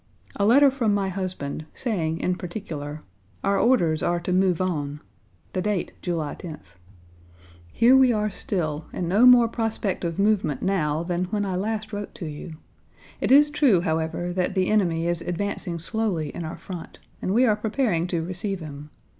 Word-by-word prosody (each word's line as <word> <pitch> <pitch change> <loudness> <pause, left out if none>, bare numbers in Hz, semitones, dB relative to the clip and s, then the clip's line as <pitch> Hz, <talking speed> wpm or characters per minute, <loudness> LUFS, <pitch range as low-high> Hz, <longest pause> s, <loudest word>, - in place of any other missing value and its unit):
A 200 - +1
letter 275 +4 +6
from 230 -6 +1
my 195 -1 0
husband 180 -6 -4
saying, 165 -10 -1
in 180 - +1
particular: 160 -5 -6 0.4
"Our 200 0 +2
orders 175 -11 +3
are 175 0 +1
to 180 - -2
move 185 -2 +2
on," 150 -6 -2 0.5
the 185 - -1
date, 205 -2 -1
July 165 -5 -2
10th. 155 - -10 1.0
"Here 245 +3 +5
we 260 -2 +6
are 210 -2 0
still 155 -6 -2
and 175 - -3
no 210 +8 +5
more 245 -2 +8
prospect 225 -5 -2
of 170 -1 -2
movement 200 -8 +1
now 160 -5 0
than 175 +1 -1
when 205 +2 -2
I 190 -2 -2
last 215 +2 -3
wrote 205 0 -5
to 175 - -6
you. 155 +2 -7 0.6
It - - 0
is 295 +2 +7
true, 270 - +4
however, 165 +2 -1
that 185 +1 -1
the 185 -1 +1
enemy 170 -6 +2
is 175 -1 -1
advancing 175 0 -3
slowly 170 -3 -1
in 175 - -5
our 160 - -6
front, 180 -3 -8 0.2
and - - -1
we 240 +5 +4
are 215 -4 +4
preparing 210 -5 0
to 170 -2 -2
receive 185 +2 -3
him. 150 -2 -9
185 Hz, 175 wpm, -25 LUFS, 165-210 Hz, 1.0 s, more